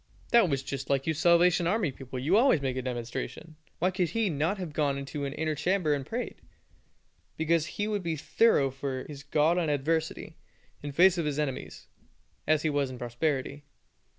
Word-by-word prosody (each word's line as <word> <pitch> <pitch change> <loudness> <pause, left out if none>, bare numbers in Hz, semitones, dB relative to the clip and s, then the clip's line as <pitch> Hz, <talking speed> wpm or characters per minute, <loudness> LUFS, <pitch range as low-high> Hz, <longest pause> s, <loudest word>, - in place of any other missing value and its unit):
That 235 -6 +5
was 135 -2 -1
just 135 0 -5
like 135 -1 +1
you 160 - +1
Salvation 170 +2 +4
Army 185 -5 +1
people, 130 0 -8
you 145 +9 +1
always 235 - +5
make 135 -2 -2
a 130 - -2
demonstration. 125 +5 -5 0.2
Why 185 +3 +1
could 180 -2 0
he 220 +1 0
not 155 +7 0
have 180 -5 -6
gone 145 -2 0
into 140 +1 -4
an 140 - -4
inner 155 0 -1
chamber 175 0 +1
and 140 -2 -2
prayed?" 235 - -5 1.0
Because 160 0 +1
he 205 - 0
would 210 -2 -1
be 165 -2 -2
thorough 150 -3 +2
for 135 -1 -4
his 145 -2 -9
God 155 +4 +2
in 165 -3 0
adversity, 160 +2 -1 0.4
in 145 - -5
the 140 - -9
face 185 +1 +5
of 165 - -1
his 150 -1 -1
enemies, 145 -4 -4 0.6
as 155 -1 +3
he 160 - +2
was 145 -2 0
in 130 - -7
prosperity. 135 +3 -2
150 Hz, 195 wpm, -28 LUFS, 140-170 Hz, 1.0 s, That